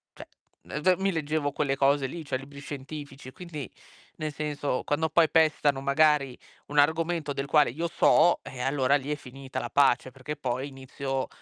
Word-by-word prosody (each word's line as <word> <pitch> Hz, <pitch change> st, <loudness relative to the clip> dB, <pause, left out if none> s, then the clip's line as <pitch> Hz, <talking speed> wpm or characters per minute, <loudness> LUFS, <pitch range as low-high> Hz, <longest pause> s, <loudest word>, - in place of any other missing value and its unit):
Cioè, -, -, -11 dB, 0.4 s
ehm, 165 Hz, +6 st, +1 dB
mi 195 Hz, 0 st, +2 dB
leggevo 155 Hz, -3 st, -1 dB
quelle 135 Hz, -1 st, 0 dB
cose 135 Hz, 0 st, +2 dB
lì, 165 Hz, +3 st, -7 dB
cioè 130 Hz, -, -1 dB
libri 140 Hz, +2 st, -11 dB
scientifici 140 Hz, -1 st, -8 dB
e -, -, -13 dB
quindi 155 Hz, -, -8 dB, 0.5 s
nel 155 Hz, -1 st, -4 dB
senso, 145 Hz, -3 st, -2 dB
quando 160 Hz, +2 st, 0 dB
poi 160 Hz, 0 st, +4 dB
pestano 150 Hz, -3 st, +3 dB
magari 140 Hz, -2 st, +3 dB, 0.3 s
un 145 Hz, -, -5 dB
argomento 160 Hz, +1 st, +2 dB
del 140 Hz, 0 st, -3 dB
quale 150 Hz, +1 st, +4 dB
io 160 Hz, +8 st, -3 dB
so, 175 Hz, +1 st, +4 dB
ehm, 125 Hz, -1 st, -6 dB
allora 135 Hz, 0 st, +2 dB
lì 145 Hz, +1 st, -2 dB
è -, -, +1 dB
finita 135 Hz, -1 st, -7 dB
la -, -, -5 dB
pace, 135 Hz, -2 st, +3 dB
perché 135 Hz, +4 st, -6 dB
poi 130 Hz, -2 st, -3 dB
inizio, 135 Hz, 0 st, -4 dB
145 Hz, 180 wpm, -27 LUFS, 135-155 Hz, 0.5 s, poi